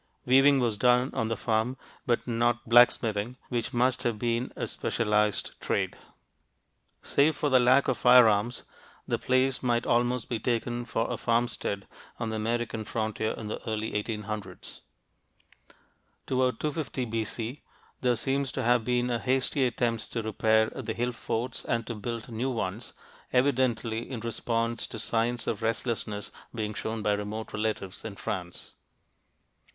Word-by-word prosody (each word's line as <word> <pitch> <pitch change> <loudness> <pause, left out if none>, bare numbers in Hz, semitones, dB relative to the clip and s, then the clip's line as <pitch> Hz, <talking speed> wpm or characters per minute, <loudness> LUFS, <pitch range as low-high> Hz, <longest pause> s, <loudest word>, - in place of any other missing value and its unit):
Weaving 135 +2 +6
was 115 -5 0
done 125 +2 +4
on 115 - 0
the 115 - -2
farm, 115 +3 0 0.3
but 120 -1 +1
not 120 0 +1
blacksmithing, 120 -1 +4
which 120 -2 -1
must 125 +1 +2
have 115 -3 0
been 120 +2 -1
a - - -2
specialized 105 -1 0
trade. - - -1 1.1
Save 145 +2 +3
for 145 - 0
the 130 - +6
lack 130 +3 +5
of 130 - 0
firearms, 120 -2 +5 0.4
the - - 0
place 130 +1 +2
might 120 -2 +1
almost 120 0 +1
be 115 - -2
taken 120 0 -1
for 115 -1 -1
a - - -2
farmstead 115 -4 -1 0.3
on 115 -2 -3
the 110 - -2
American 115 0 -1
frontier 110 0 -2
in 110 - -7
the 105 - -4
early 110 0 -2
1800's. 105 -2 -5 1.4
Toward 130 -1 +1
250 150 -4 -2
B.C. 115 +3 -3 0.4
there 125 -1 +2
seems 135 +2 -1
to 130 - -2
have 120 0 +3
been 125 +1 +1
a 120 - 0
hasty 130 +1 +1
attempt 115 -2 -1
to 115 - -2
repair 110 +1 +2
the - - -4
hill 120 +1 -1
forts 120 +1 -3
and 115 -1 -1
to 120 - -4
build 115 +1 -5
new 120 +2 -2
ones, 110 -2 -3 0.4
evidently 125 -3 +1
in 130 -4 -4
response 115 0 -1
to - - -7
signs 115 +2 0
of 105 - -2
restlessness 115 -2 -2 0.2
being 105 -2 -2
shown 110 +1 -4
by 105 - +2
remote 105 +2 -4
relatives 105 -3 -3
in 110 -3 -6
France. 90 -3 -5
115 Hz, 150 wpm, -28 LUFS, 110-125 Hz, 1.4 s, Weaving